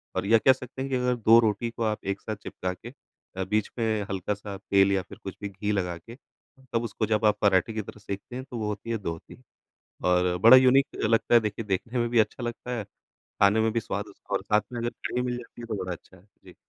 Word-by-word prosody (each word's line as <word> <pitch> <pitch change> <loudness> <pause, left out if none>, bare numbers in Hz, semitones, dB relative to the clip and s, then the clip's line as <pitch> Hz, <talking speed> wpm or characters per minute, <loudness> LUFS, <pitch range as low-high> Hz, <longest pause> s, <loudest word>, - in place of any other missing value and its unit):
और 95 +1 -1
ये 115 +3 +6
कह 130 - +6
सकते 130 0 -9
हैं 135 - -3
कि - - +2
अगर 125 0 +1
2 115 -1 +6
रोटी 110 +1 +1
को 115 0 -5
आप 110 -1 0
एक 100 0 -2
साथ 110 - -4
चिपका 90 0 -4
के 110 +6 -11 0.5
अ, 95 - 0
बीच 105 +2 0
में 115 - +1 0.3
हल्का-सा 100 +1 -3
तेल 100 0 +3
या 95 - +2
फिर - - -13
कुछ 95 - -6
भी 100 - -4
घी 100 +2 -3
लगा 90 -4 -1
के, 115 +8 -12 0.6
तब 115 0 +1
उसको 110 0 -2
जब 110 0 +1
आप 105 -1 +4
पराठे 100 +1 +3
की 110 - -2
तरह 105 +1 -11
सेंकते 100 +4 -7
हैं 130 - -4
तो 120 - -4
वो 110 -2 -2
होती 105 +2 -5
है 115 - 0
दोहती 85 +5 -7 0.6
और 90 0 +2
बड़ा 120 +3 +10
यूनिक 130 +1 +5 0.2
लगता 115 +2 +2
है, - - +9
देखिए 105 +1 -3
देखने 110 +5 -2
में 120 - 0
भी 115 -1 +3
अच्छा 110 +3 0
लगता 120 +1 -5
है 105 - -3 0.6
खाने 100 +2 +5
में 110 - +2
भी 115 - +2
स्वाद 105 -1 -4
उसका 100 - -11
और - - 0
साथ 105 0 +2
में 120 - -3
अगर 120 0 -1
कढ़ी 125 - -4
मिल 125 -1 -2
जाती 120 0 -11
है - - -6
तो 110 - -2
बड़ा 90 - -4
अच्छा 90 +2 -14
है। 85 - -21 0.2
जी। - - -13
110 Hz, 255 wpm, -27 LUFS, 100-120 Hz, 0.6 s, बड़ा